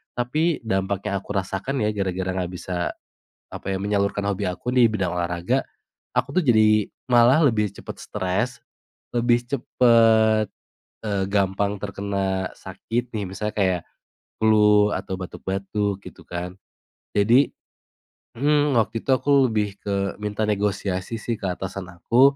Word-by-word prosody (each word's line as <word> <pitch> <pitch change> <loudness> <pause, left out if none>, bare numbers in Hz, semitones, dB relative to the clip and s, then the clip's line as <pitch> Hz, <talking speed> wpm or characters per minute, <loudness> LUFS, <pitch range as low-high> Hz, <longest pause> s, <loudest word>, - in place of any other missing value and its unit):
Tapi 150 +6 0
dampak 100 -1 -1
yang 100 - 0
aku 100 +2 -7
rasakan 100 +7 -2
ya 105 - +2
gara-gara 95 -2 -2
nggak 90 -1 -3
bisa, 90 0 -3 0.6
apa - - -6
ya, 95 - 0
menyalurkan 100 0 0
hobi 100 -1 -1
aku 120 +7 -4
di 125 -2 +6
bidang 95 -5 -1
olahraga, 85 0 0 0.5
aku - - 0
tuh 180 - 0
jadi 110 -4 +4 0.2
malah 120 +4 +6
lebih 105 -7 +2
cepat 100 - -9
stres, 95 +6 -1 0.7
lebih 120 0 +3
cepet, 115 -4 +4 0.6
eee, 100 -3 0
gampang 100 0 +1
terkena 100 -2 -2
sakit 120 +1 -4
nih, 105 -2 -2
misalnya 105 +3 -4
kayak 95 -4 +1 0.6
flu 105 -1 +5
atau 95 0 -4
batuk-batuk 100 +2 -3
gitu - - -11
kan. 90 +1 -5 0.6
Jadi 120 +7 +4 0.9
mhm, 145 0 +2
waktu 115 +1 0
itu - - -11
aku 140 0 +3
lebih 105 -2 -1
ke 100 -1 -2 0.3
minta 105 +1 -2
negosiasi 100 -1 -1
sih 115 - -2
ke 100 - -3
atasan 95 +1 -5
aku 125 +10 +4
105 Hz, 135 wpm, -23 LUFS, 95-115 Hz, 0.9 s, di